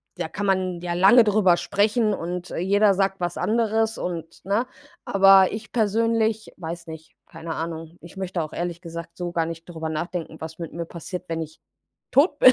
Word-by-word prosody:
da - - -3
kann 205 - -4
man 185 -2 0
ja 175 -1 -2
lange 195 +7 +7
darüber 200 -4 +4
sprechen 210 +3 +1
und 180 0 -4
jeder 200 +3 +3
sagt 195 0 0
was 175 -1 -2
anderes 225 0 +1
und 165 -2 -5
ne? 205 +5 +1 0.4
Aber 195 -1 +6
ich 215 +1 -7
persönlich, 225 0 +1
weiß 170 0 -6
nicht, 160 0 -10
keine 165 0 -6
Ahnung. 165 0 -5
Ich 170 +3 -13
möchte 185 -2 -2
auch 155 - -6
ehrlich 175 0 -4
gesagt 170 -1 -8
so 175 -1 -3
gar 165 -1 0
nicht 165 0 -7
darüber 160 -2 -4
nachdenken, 160 0 -4
was 160 +1 -8
mit 165 -2 -6
mir 170 0 -4
passiert, 180 +2 -7
wenn 165 0 -2
ich 160 0 -8 0.5
tot 290 +1 +4
bin. 255 - +9
180 Hz, 185 wpm, -24 LUFS, 165-205 Hz, 0.5 s, bin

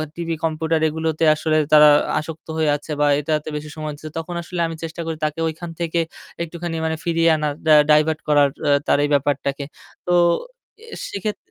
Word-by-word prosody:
TV, 170 -1 -3
computer 160 0 0
এগুলোতে 160 0 -2
আসলে 155 0 0 0.2
তারা 150 0 +9 0.3
আসক্ত 160 +1 -8
হয়ে 155 -1 +2
আছে 145 +2 -8
বা - - +4
এটাতে 150 0 -2
বেশি 150 0 -6
সময় 155 -1 -4
দিচ্ছে 155 +2 -10
তখন 165 +2 -5
আসলে 175 +1 -6
আমি 165 - -6
চেষ্টা 165 +1 -5
করি 160 -1 -4
তাকে 155 +1 -3
ঐখান 165 +2 -6
থেকে 170 0 -1 0.4
একটুখানি 170 0 -5
মানে 160 0 -1
ফিরিয়ে 165 -1 +2
আনার 150 -1 -1
ডা - - +5 0.2
ডাইভার্ট 155 +1 +3
করার 145 -1 +4 0.2
আ - - +3 0.2
তার - - +4
এই 145 - 0
ব্যাপারটাকে। 140 0 0 0.4
তো 180 - -1 0.7
এ - - -13 0.2
সেক্ষেত্রে 205 +1 -5
160 Hz, 185 wpm, -21 LUFS, 150-165 Hz, 0.7 s, তারা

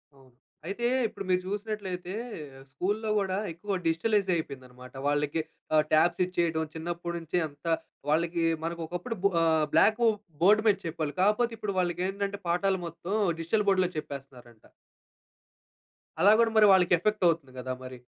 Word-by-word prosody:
అవును. 135 -1 -20 0.4
అయితే. 220 +6 -3 0.2
ఇప్పుడు 200 - -8
మీరు 180 0 +3
చూసినట్లయితే. 195 -3 -4 0.6
స్కూల్లో 205 +9 -2
కూడా 190 -1 -1
ఎక్కువ 195 +5 -4
డిజిటలైజ్ 195 +5 +1
అయిపోయింది 140 -5 -5
అన్నమాట. 125 0 -14
వాళ్ళకి 145 +2 0 0.3
ఆహ్, 155 - +5
టాబ్స్ 170 +3 +4
ఇచ్చేయడం 170 -3 0
చిన్నప్పటి 170 +1 -4
నుంచి 165 +1 -3
అంత, 145 +2 -20 0.4
వాళ్ళకి 165 +2 +1 0.2
మనకి 170 +1 -3
ఒకప్పుడు 180 +8 -4
బు 200 - +5
ఆహ్, 160 -2 +3
బ్లాకు 225 +2 +5 0.4
బోర్డ్ 210 +3 +6
మీద 205 -2 +5
చెప్పారు. 155 -3 -3
కాకపోతే 215 +4 +2
ఇప్పుడు 205 -2 -3
వాళ్ళకి 175 0 0
ఏంటంటే 200 0 -3
పాఠాలు 190 +2 +1
మొత్తం 170 +3 -6 0.3
డిజిటల్ 205 +6 0
బోర్డ్‌లో 185 -2 +3
చెప్పేస్తున్నారంట. 135 -6 -9 1.5
అలా 205 - +7
కూడా 230 -1 +4
మరి 215 - +8
వాళ్ళకి 180 -1 +5
ఎఫెక్ట్ 210 +2 0
అవుతుంది 160 -5 0
కదా, 130 0 -3
మరి. 130 -1 -9
175 Hz, 145 wpm, -28 LUFS, 155-200 Hz, 1.5 s, మరి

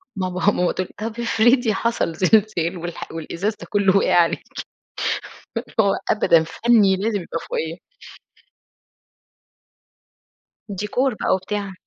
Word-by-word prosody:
ماما 185 -1 -2
ماما 180 -2 +1
تقُول 185 - -3
لي 225 - -1
طَب 230 - -11
افرضي 235 0 +3
حصل 230 -6 -1
زلزال 185 -2 +2
والح 175 0 -7
والإزاز 170 +6 -3
ده - - -11
كله 200 -2 +3
وقع - - +2
عليكِ، 170 -1 +3 1.2
اللي - - -6
هو 200 -1 +2 0.2
أبدًا 170 -6 +4
فنّي 200 +3 +3
لازم 205 +1 -1
يبقى 165 - -5
فوقيّا. 160 +1 -3 2.9
ديكور 210 +7 -1
بقى - - -3
وبتاع. 195 +1 -4
195 Hz, 120 wpm, -21 LUFS, 175-220 Hz, 2.9 s, أبدًا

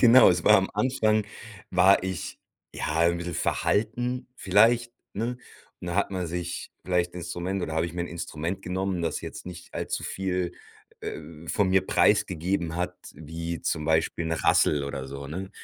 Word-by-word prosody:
Genau, 120 0 +9
es 90 -1 0
war - - +8
am 95 0 +1
Anfang 110 -1 +2 0.5
war 95 +1 +5
ich, 95 -2 -4 0.4
ja, 80 +2 0
'n 85 0 +3
bissel 85 0 -4
verhalten 120 +9 0
vielleicht, 115 +5 +4 0.2
ne? 115 +4 -2 0.4
Und - - -7
dann 85 - -2
hat 100 - +2
man 90 -2 -2
sich 85 +1 -4
vielleicht 90 -1 +1
'n - - -7
Instrument 90 +2 -3
oder 80 -2 -3
hab 80 - +2
ich 85 - -4
mir 85 0 -2
'n - - -3
Instrument 85 +2 -4
genommen, 95 -1 -2
das 80 - -1
jetzt - - -8
nicht 90 -1 -9
allzu - - -3
viel, 90 -2 -2 0.5
äh, - - -5 0.3
von 100 -3 +2
mir 95 0 +4
preisgegeben 85 -1 +2
hat 90 +1 -1 0.2
wie, 80 +1 -5
zum 75 - -1
Beispiel, 80 +1 +1
'n 80 - -1
Rassel 75 -2 +3
oder 70 -1 -5
so, 70 0 -7
ne? 95 +6 -5
90 Hz, 175 wpm, -27 LUFS, 85-95 Hz, 0.5 s, Genau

